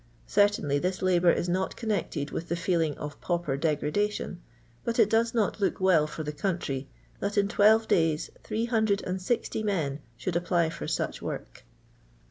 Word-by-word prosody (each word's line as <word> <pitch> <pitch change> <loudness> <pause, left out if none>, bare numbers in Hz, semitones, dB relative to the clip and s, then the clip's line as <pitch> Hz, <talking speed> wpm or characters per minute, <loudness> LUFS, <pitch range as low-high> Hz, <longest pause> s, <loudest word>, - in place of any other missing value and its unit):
Certainly 205 -9 +2
this 185 +4 -2
labour 180 -2 +4
is 175 - -1
not 185 +2 -1
connected 195 -10 -2
with 170 - -5
the 170 - +1
feeling 165 -3 0
of 145 0 -7
pauper 170 -6 -1
degradation, 165 +6 -1 0.4
but 235 - -2
it 220 -3 +4
does 230 +1 +2
not 215 -2 +1
look 195 - +1
well 180 -5 +4
for 155 +1 -6
the 150 - -3
country 145 -5 -2 0.3
that 205 +1 -2
in 200 -1 +4
twelve 220 +2 +4
days 160 -2 +1 0.2
860 220 -2 0
men 160 -10 -1 0.2
should 180 +6 -3
apply 170 -1 +1
for 165 - -6
sudh - - -2
work. - - -6
180 Hz, 155 wpm, -28 LUFS, 160-205 Hz, 0.4 s, labour